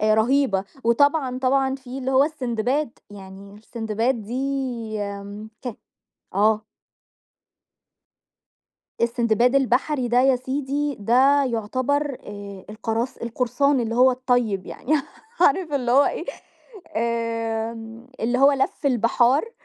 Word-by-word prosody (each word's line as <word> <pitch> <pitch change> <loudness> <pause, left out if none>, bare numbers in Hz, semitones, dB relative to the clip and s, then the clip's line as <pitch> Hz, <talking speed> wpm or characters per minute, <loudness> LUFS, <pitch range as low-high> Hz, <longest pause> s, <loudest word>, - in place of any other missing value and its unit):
آآ 215 0 +3
رهيبة، 220 -4 +2 0.2
وطبعًا 260 +2 +2
طبعًا 265 +1 +1
في 265 -1 -8
اللي 260 0 -2
هو 265 +1 +5
السندباد، 260 -2 -2
يعني 195 0 -11
السندباد 225 +2 -2
دي 245 +6 -3 0.6
آمم 200 +1 -6
كا 245 -4 -4 0.6
آه. 215 +2 +2 2.4
السندباد 235 +1 +2
البحري 265 0 +1
ده 245 +1 +3
يا 265 0 +4
سيدي 280 +3 -2
ده 265 +7 +4
يعتبر، 255 +4 -1
آآ 200 -2 -9
القراص 225 +3 -3
القُرصان 255 +4 0
اللي 230 -1 -2
هو 255 +2 +6
الطيب 245 -7 0
يعني، 290 - -3 0.5
عارف 360 -5 +3
اللي 250 -4 0
هو 280 +3 +6
إيه، 335 - -2 0.7
آمم، 230 0 -3
اللي 240 +2 0
هو 275 +2 +6
لفّ 275 +1 -1
البحار 250 - +2
245 Hz, 115 wpm, -23 LUFS, 225-270 Hz, 2.4 s, هو